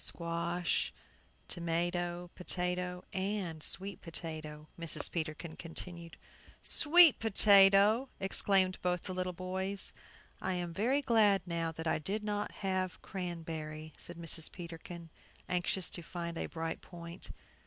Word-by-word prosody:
"Squash, 170 0 -1 0.6
tomato, 175 +1 -1
potato, 180 0 -2
and 190 -4 -2
sweet 195 +4 0
potato," 155 -2 -5
Mrs. 165 -2 0
Peterkin 160 0 -4
continued. 170 0 -8 0.5
"Sweet 325 -1 +8
potato!" 205 +3 +6
exclaimed 190 -1 +2
both 180 -1 0
the 185 - -4
little 185 0 -1
boys. 190 +2 -3 0.5
"I 185 - -1
am 175 -1 -3
very 255 +10 +1
glad 210 -6 +4
now 165 -2 -1
that 160 +1 -6
I 160 -1 +1
did 205 +7 -3
not 210 -1 -2
have 185 -1 -1
cranberry," 160 -4 -5
said 175 - -10
Mrs. 165 -1 -1
Peterkin, 170 -1 -9 0.4
anxious 180 +1 +1
to 175 - -3
find 170 +1 -5
a - - -3
bright 165 0 -4
point. 170 -1 -10
175 Hz, 120 wpm, -33 LUFS, 165-190 Hz, 0.6 s, Sweet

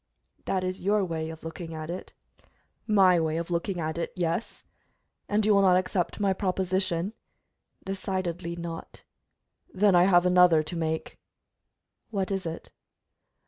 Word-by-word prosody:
"That 185 -1 0
is 185 0 -4
your 205 0 +2
way 160 -2 -3
of 160 -1 -9
looking 165 0 -7
at 155 +1 -5
it." 180 - -7 0.7
"My 190 -5 +5
way 160 -1 0
of 170 +1 -4
looking 175 +2 -1
at 160 0 -2
it, 170 - -3
yes." 175 +3 -3 0.6
"And 210 0 +2
you 215 - +5
will 200 - +5
not 185 -2 +5
accept 185 0 -1
my 200 -2 +2
proposition?" 185 -1 -1 0.7
"Decidedly 185 -3 -3
not." 170 -1 -7 0.7
"Then 200 +1 +3
I 175 0 +6
have 175 -2 +5
another 180 -3 +5
to 155 +3 -6
make." 160 -1 -3 0.9
"What 200 -3 -2
is 195 -3 -2
it?" 165 - -7
180 Hz, 145 wpm, -27 LUFS, 165-190 Hz, 0.9 s, I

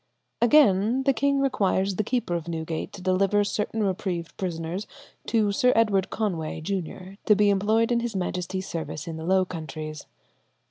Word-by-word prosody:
Again, 235 -2 +4
the 275 0 +3
king 280 +1 +1
requires 195 -7 +1
the 215 - 0
keeper 235 -4 -1
of 170 -1 -3
Newgate 160 -1 -4
to 195 -3 -9
deliver 195 +2 +2
certain 210 +2 -2
reprieved 185 -3 -2
prisoners 175 +2 -4 0.4
to 215 -3 +2
Sir 250 +5 +3
Edward 205 -4 +2
Conway, 170 -9 -2
Junior, 185 +2 -5
to 210 - +7
be 205 0 +4
employed 220 +4 +2
in 240 - +3
his 235 -2 -3
Majesty's 185 0 -3
service 160 -2 -5
in 165 -1 -5
the 160 - -6
Low 190 0 +3
Countries. 155 -3 -7
195 Hz, 165 wpm, -26 LUFS, 175-215 Hz, 0.4 s, to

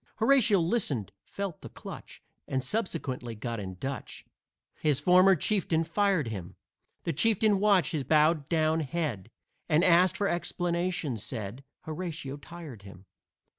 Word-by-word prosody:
Horatio 230 -3 +4
listened, 165 - 0
felt 195 -5 -5
the - - -9
clutch, - - -10 0.2
And 130 -1 -1
subsequently 135 - -3
got 115 +1 -4
in 95 -2 -6
Dutch, 135 +8 -6 0.5
His 150 -4 +2
former 185 +1 +6
chieftain 170 -2 +1
fired 180 - +1
him. 95 -6 -7 0.5
The 165 - -1
chieftain 210 +4 +3
watched 195 -6 +3
his 155 -5 -1
bowed 155 +1 +3
down 160 -1 +2
head, 150 - -3 0.4
And, 155 +3 +4
asked 180 +3 +5
for 205 -2 +1
explanation, 175 - -1
said 110 +3 -6 0.2
Horatio 160 -4 -5
tired 150 -7 -10
him. 100 -1 -13
160 Hz, 135 wpm, -29 LUFS, 130-185 Hz, 0.5 s, former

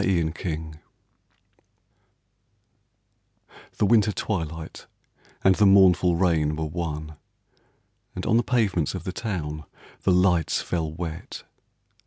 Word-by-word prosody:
73 85 -5 +1
A 85 0 -4
VISITOR 80 -1 -10 3.0
The - - +2
winter 105 -1 +4
twilight 80 -6 -5 0.6
and 95 - +6
the 105 +2 +4
mournful 95 -3 +5
rain 80 -4 +1
Were 80 0 -3
one, 80 -1 -5 1.0
and 90 - -5
on 115 - +2
the - - +4
pavements 100 - 0
of 90 - -6
the 90 - -5
town 80 -9 -4 0.4
The 95 - +2
lights 90 -3 +2
fell 80 -3 -3
wet. 80 0 -7
85 Hz, 115 wpm, -25 LUFS, 80-95 Hz, 3.0 s, and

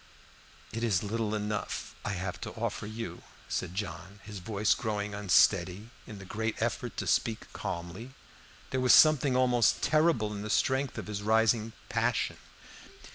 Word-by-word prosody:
"It 115 +1 -3
is 105 -6 +2
little 110 0 -1
enough 105 0 -3
I 105 - -2
have 90 -1 -4
to - - -4
offer 105 - -3
you," 115 +2 -6 0.3
said 90 - -3
John, 95 0 -5
his 105 -1 -8
voice 105 +1 +1
growing 105 -2 -3
unsteady 100 +1 +3 0.2
in 105 - -8
the 100 - -10
great 110 +3 -3
effort - - -2
to - - -2
speak 110 -1 0
calmly. 90 +9 -6 0.6
There 130 - 0
was 125 - +6
something 145 -4 +6
almost 125 -3 +3
terrible 155 -9 +2
in 100 - -5
the 105 - -5
strength 130 +5 +1
of - - -4
his 105 -1 -4
rising 110 +1 +2
passion. - - 0
105 Hz, 155 wpm, -30 LUFS, 100-115 Hz, 0.6 s, was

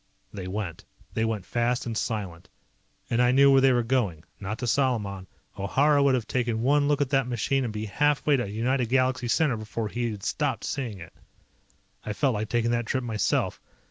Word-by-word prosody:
They 95 -3 -6
went. 95 -3 -4 0.3
They 110 - 0
went 110 -4 -2
fast 120 +1 0
and 115 -2 -3
silent. 100 -7 -4 0.6
And 120 +1 +3
I 125 0 +4
knew 140 +2 +6
where 135 -1 +6
they 135 0 +5
were 120 -1 +2
going. 115 -10 0 0.2
Not 100 +2 -4
to 125 - -4
Salaman. 110 -7 0 0.3
O'Hara 140 +9 +3
would 140 -2 +4
have 120 -3 -2
taken 120 -1 -1
one 145 +2 +3
look 145 -1 +2
at 140 -2 0
that 135 -3 +2
machine 125 +3 0
and 120 - -2
be 105 0 -4
half 145 +7 +1
way 150 - +4
to 125 -6 -1
United 120 +3 0
Galaxy 130 -1 +1
Center 135 0 +2
before 110 0 -4
he 120 +1 -2
had 105 -3 -7
stopped - - -1
seeing 120 -7 -3
it. 85 - -11 0.9
I 105 - -3
felt 135 +4 +1
like 110 0 -3
taking 120 -1 +1
that 120 -1 -1
trip 130 0 -1
myself. 110 -3 -1
120 Hz, 205 wpm, -26 LUFS, 110-130 Hz, 0.9 s, knew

